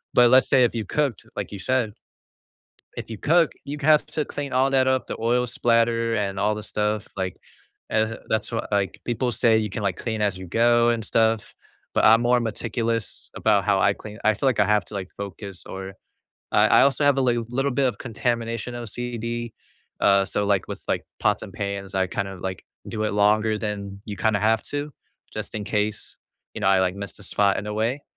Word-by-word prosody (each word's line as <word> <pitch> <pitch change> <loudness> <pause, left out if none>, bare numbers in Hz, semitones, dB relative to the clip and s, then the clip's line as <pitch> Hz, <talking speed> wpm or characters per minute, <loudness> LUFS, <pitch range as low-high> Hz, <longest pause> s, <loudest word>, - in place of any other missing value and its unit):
but 120 -1 +7
let's 130 0 +6
say 130 -2 +5
if 120 - +2
you 110 - -1
cooked 140 -2 -1
like - - -4
you 100 - -7
said, 120 0 0 1.1
if - - -6
you 110 - -6
cook, 165 +1 +3
you 145 +1 -5
have 150 +1 +5
to 150 - -2
clean 140 -2 -5
all 130 +2 +3
that 130 -1 +3
up, 130 -1 +1
the - - -4
oil 120 +2 +2
splatter 115 -1 +2
and 100 -2 -2
all 105 +1 +2
the 105 - -6
stuff 105 0 -1
like, 95 -2 -3 0.5
as, 110 +1 +1
that's 110 +2 0
what 115 - -3
like 100 -1 0
people 120 +1 -1
say 110 0 +3
you 105 -1 -1
can, 105 - -4
like, 95 -3 0
clean 110 -2 -3
as 100 -3 0
you 95 - -8
go 120 +4 +3
and 115 -2 -1
stuff, 110 0 +1 0.4
but - - +3
I'm 115 +2 +7
more 125 +1 +4
meticulous 115 0 -3
about - - +2
how - - +2
I - - +4
clean, 105 +1 -10
I 110 -1 +4
feel 135 - +1
like 120 - +1
I 100 - +4
have 105 -1 +2
to 105 - -9
like 95 -2 -5
focus 100 -1 -7
or 95 0 -7 0.6
I - - +5
I - - +6
also 140 +1 +3
have 140 -1 +4
a - - +3
li 120 -2 +2
little 135 +3 0
bit 135 0 +2
of - - -5
contamination 115 0 -2
OCD, 120 0 -4 0.5
uh, 100 -1 +4
so 105 +1 -1
like, 100 -3 +1
with, - - -6
like, - - 0 0.2
pots - - +1
and - - -8
pans, 100 -1 -4
I 95 -1 +2
kind 100 0 -3
of, 95 -2 -9
like, 95 0 -5 0.2
do 110 -1 -3
it 105 - -1
longer 105 +1 +3
than 100 -2 -5
you 105 -2 -5
kinda 110 -2 +1
have 110 +1 +2
to, 145 +1 -4 0.4
just - - -6
in 105 -1 -3
case, 105 0 -2 0.4
you - - -5
know, - - +3
I, 95 -1 +5
like, 90 0 +1
missed 100 +1 -7
a - - -10
spot 100 +1 +2
in 105 - -5
a 105 - -3
way; 120 +6 -1
110 Hz, 220 wpm, -24 LUFS, 100-120 Hz, 1.1 s, but